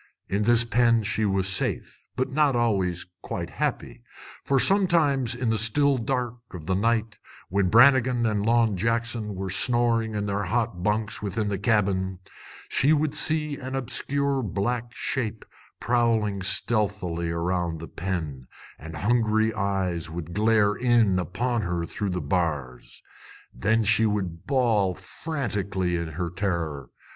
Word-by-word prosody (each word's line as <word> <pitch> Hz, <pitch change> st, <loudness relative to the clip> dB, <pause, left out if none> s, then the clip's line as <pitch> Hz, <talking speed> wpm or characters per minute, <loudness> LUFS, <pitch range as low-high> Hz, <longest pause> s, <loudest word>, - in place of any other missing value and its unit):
In 100 Hz, +2 st, -1 dB
this 120 Hz, 0 st, +4 dB
pen 115 Hz, -1 st, +3 dB
she 105 Hz, +1 st, 0 dB
was 95 Hz, -1 st, +1 dB
safe, 95 Hz, -1 st, -1 dB
but 130 Hz, +1 st, -1 dB
not 145 Hz, -2 st, +2 dB
always 95 Hz, -7 st, 0 dB, 0.2 s
quite -, -, -5 dB
happy; -, -, -3 dB, 0.4 s
for 135 Hz, -1 st, +2 dB
sometimes 150 Hz, -, +3 dB
in 120 Hz, -2 st, -1 dB
the 110 Hz, -, 0 dB
still 135 Hz, +5 st, +2 dB
dark 125 Hz, 0 st, -2 dB, 0.2 s
of 80 Hz, -3 st, -8 dB
the 95 Hz, -, 0 dB
night, 110 Hz, +1 st, 0 dB, 0.3 s
when 95 Hz, 0 st, +1 dB
Brannigan 125 Hz, 0 st, +5 dB
and 105 Hz, -2 st, 0 dB
Long 115 Hz, -1 st, +3 dB
Jackson 115 Hz, 0 st, -1 dB
were 95 Hz, 0 st, -4 dB
snoring 115 Hz, 0 st, +2 dB
in 105 Hz, -1 st, -1 dB
their 100 Hz, 0 st, -2 dB
hot 110 Hz, -2 st, -1 dB
bunks 105 Hz, +2 st, -1 dB
within 105 Hz, +1 st, -2 dB
the 100 Hz, -2 st, -2 dB
cabin, 95 Hz, -3 st, +1 dB, 0.5 s
she 145 Hz, +4 st, +3 dB
would 150 Hz, -1 st, +1 dB
see 150 Hz, -1 st, 0 dB
an 130 Hz, 0 st, -6 dB
obscure 140 Hz, +1 st, -1 dB
black 115 Hz, +3 st, -2 dB
shape 115 Hz, -3 st, -3 dB, 0.3 s
prowling 115 Hz, -4 st, +1 dB
stealthily 95 Hz, -5 st, 0 dB
around 85 Hz, 0 st, -1 dB
the 85 Hz, -, -8 dB
pen, 80 Hz, -9 st, -4 dB, 0.3 s
and 80 Hz, +2 st, -9 dB
hungry 110 Hz, +2 st, +1 dB
eyes 95 Hz, -5 st, -1 dB
would 85 Hz, 0 st, -6 dB
glare 105 Hz, 0 st, +3 dB
in 115 Hz, -5 st, +2 dB
upon 115 Hz, +7 st, -1 dB
her 85 Hz, -3 st, -2 dB
through 100 Hz, +4 st, -4 dB
the 90 Hz, -1 st, -2 dB
bars. 75 Hz, -9 st, -3 dB, 0.5 s
Then 110 Hz, -, +1 dB
she 110 Hz, +1 st, +3 dB
would 95 Hz, -6 st, -3 dB
bawl 115 Hz, -9 st, +2 dB
frantically 100 Hz, -, -3 dB
in 85 Hz, -2 st, -4 dB
her 85 Hz, +2 st, -3 dB
terror. 85 Hz, -8 st, -3 dB
105 Hz, 145 wpm, -25 LUFS, 95-120 Hz, 0.5 s, Brannigan